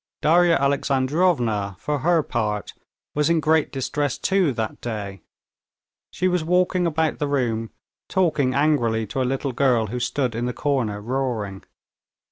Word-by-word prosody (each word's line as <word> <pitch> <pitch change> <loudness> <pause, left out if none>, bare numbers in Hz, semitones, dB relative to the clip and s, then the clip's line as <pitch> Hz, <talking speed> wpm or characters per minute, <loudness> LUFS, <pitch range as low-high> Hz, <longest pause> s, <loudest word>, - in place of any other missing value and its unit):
Darya 170 +2 +5
Alexandrovna, 135 - +1
for 150 +7 -2
her 165 +2 +2
part, 105 -5 -2 0.4
was 150 +1 +1
in 170 -1 +3
great 155 0 +2
distress 140 +1 -2
too 190 -6 +2
that 110 -1 -4
day. 100 -5 -5 0.9
She 185 - -1
was 180 -3 +1
walking 180 +1 +2
about 160 -1 0
the 145 - 0
room, 115 -5 -1 0.4
talking 150 -9 +1
angrily 120 -7 +2
to 110 +6 -3
a 125 - 0
little 135 +1 -2
girl, 125 -3 +2
who 125 - -2
stood 125 0 -1
in 120 +2 -2
the 125 - -2
corner 125 -9 -1
roaring. 110 -4 -3
135 Hz, 145 wpm, -23 LUFS, 115-155 Hz, 0.9 s, Darya